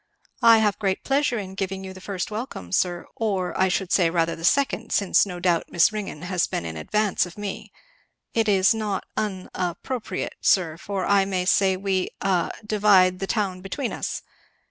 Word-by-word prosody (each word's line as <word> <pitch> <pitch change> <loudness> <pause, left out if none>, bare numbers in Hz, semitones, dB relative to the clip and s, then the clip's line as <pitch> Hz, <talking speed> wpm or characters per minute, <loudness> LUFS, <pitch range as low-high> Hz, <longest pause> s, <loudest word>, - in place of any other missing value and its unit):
"I 230 -1 +8
have 210 -2 +1
great 195 -3 -1
pleasure 275 -2 +1
in 190 -3 -5
giving 195 0 -4
you 190 0 -7
the 185 - -12
first 195 0 -4
welcome, 210 - -6
sir, 175 - 0
or, 195 -5 -1
I 190 - +3
should 185 0 -1
say, 175 -4 +4
rather 165 -1 0
the 165 - -11
second; 275 +10 +1
since 200 0 +3
no 180 -2 -6
doubt 175 -2 +1
Miss 175 +3 +4
Ringgan 200 -7 -5
has 180 -1 0
been - - -3
in 80 -1 -5
advance 205 - 0
of 175 - -13
me. 205 -2 -6 0.6
It 225 -2 +1
is 190 +1 +4
not 215 -3 -2
un 190 -4 -3
a 180 -1 -1
appropriate, 255 -4 -4
sir, 170 -5 +3
for 190 +2 -4
I 200 -1 +4
may 185 -2 -1
say 190 0 +3
we 190 -1 -1
a 185 -3 +1 0.2
divide 195 -4 +4
the 195 - -3
town 190 -4 -1
between 230 +7 -4
us. - - -4
190 Hz, 190 wpm, -24 LUFS, 180-210 Hz, 0.6 s, I